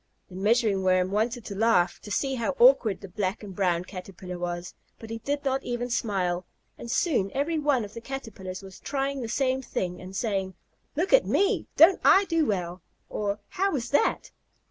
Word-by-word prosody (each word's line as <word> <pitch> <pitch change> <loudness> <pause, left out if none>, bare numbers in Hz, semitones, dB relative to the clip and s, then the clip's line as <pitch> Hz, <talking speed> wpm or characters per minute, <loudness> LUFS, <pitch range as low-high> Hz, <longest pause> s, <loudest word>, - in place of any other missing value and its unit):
The 180 - -11
Measuring 210 0 +2
Worm 185 0 +2
wanted 230 +3 -1
to - - -5
laugh 200 -4 +2
to - - -11
see 270 +7 0
how 245 - -1
awkward 475 - +5
the 195 - -8
black 190 +2 -3
and 195 -3 -8
brown 180 -3 +1
Caterpillar 185 -1 -8
was, 175 0 -4 0.2
but 225 0 -10
he 225 - -4
did 285 +5 -3
not 270 0 +1
even 245 0 -3
smile, 185 -6 0 0.3
and 235 - -9
soon 245 - +1
every 310 +4 0
one 285 -6 +1
of 205 - -12
the 230 - -7
Caterpillars 205 -8 -7
was 190 -1 -11
trying 275 -1 -2
the 235 - -3
same 260 +1 +1
thing, 180 -7 -4
and 185 +1 -9
saying 195 -3 -1 0.4
"Look 350 +9 0
at - - +6
me. 400 - +1
Don't 335 +5 +7
I 395 +1 +6
do 330 -4 +1
well?" 180 -3 -2 0.3
or, 205 0 -2
"How 390 +2 0
was 240 -5 -3
that?" 290 - +1
220 Hz, 190 wpm, -27 LUFS, 190-270 Hz, 0.4 s, Don't